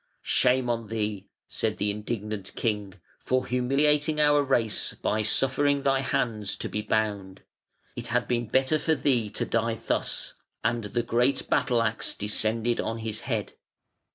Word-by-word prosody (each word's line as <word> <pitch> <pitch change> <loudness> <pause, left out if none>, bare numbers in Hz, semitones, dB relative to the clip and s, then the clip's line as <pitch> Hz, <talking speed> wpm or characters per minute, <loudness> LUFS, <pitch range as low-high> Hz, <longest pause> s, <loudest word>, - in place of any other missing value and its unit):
"Shame 125 0 +3
on 115 -2 -2
thee", 105 -3 -3 0.2
said - - -1
the 105 +1 +1
indignant 105 -1 -5
king, 105 -4 -2 0.2
"for 130 0 0
humiliating 145 +5 +2
our 150 -1 +5
race 120 -6 +1
by 110 +1 -1
suffering 140 +5 +2
thy 135 -1 +2
hands 115 -5 -1
to - - -3
be 105 - -3
bound. 105 -3 -2 0.5
It - - -5
had - - 0
been 120 -1 -1
better 130 +6 +2
for 160 +2 +1
thee 125 -7 +1
to - - -2
die 115 0 0
thus", - - -1 0.3
and 115 -2 0
the 120 +3 -1
great 120 +3 +1
battle 125 -2 +2
axe 110 0 0
descended 110 +3 +1
on 115 - -3
his 110 -1 -4
head. - - -3
115 Hz, 155 wpm, -27 LUFS, 105-130 Hz, 0.5 s, our